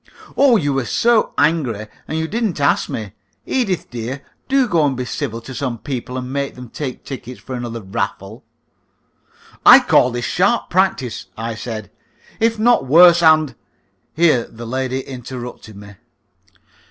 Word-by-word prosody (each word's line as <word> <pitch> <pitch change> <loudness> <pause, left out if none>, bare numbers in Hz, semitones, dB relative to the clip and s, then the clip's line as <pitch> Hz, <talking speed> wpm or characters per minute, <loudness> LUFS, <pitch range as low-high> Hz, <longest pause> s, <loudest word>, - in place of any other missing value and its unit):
"Oh! 270 -4 +5
you 145 -7 0
were 135 -2 -1
so 235 - +2
angry, 130 -10 +1 0.2
and 155 - -3
you 160 0 -1
didn't 220 -4 -2
ask 140 - +2
me. 105 -4 -5 0.3
Edith, 205 -9 -1
dear, 125 +4 -5 0.3
do 270 -1 +3
go 170 -7 +2
and 140 -3 0
be 125 - -3
civil 120 -3 -4
to 130 +3 -9
some 125 -2 -3
people, 130 0 -5
and 125 +1 -5
make 140 0 -2
them 125 -2 -10
take 135 -2 -6
tickets 125 -3 -8
for 130 - -9
another 120 -2 -5
raffle." 95 - -4 1.2
"I - - +10
call 125 - +3
this 120 0 -4
sharp 200 +6 +1
practice," 175 - 0
I 115 +1 -3
said, 110 -2 -7 0.5
"if 225 0 +2
not 230 - +3
worse, 170 +4 +7
and 155 -3 +4 0.3
" - - -46
Here 155 -8 +3
the - - -21
other - - -7
lady 130 +2 -2
interrupted 125 -4 -8
me. 100 0 -12
130 Hz, 165 wpm, -19 LUFS, 120-170 Hz, 1.2 s, I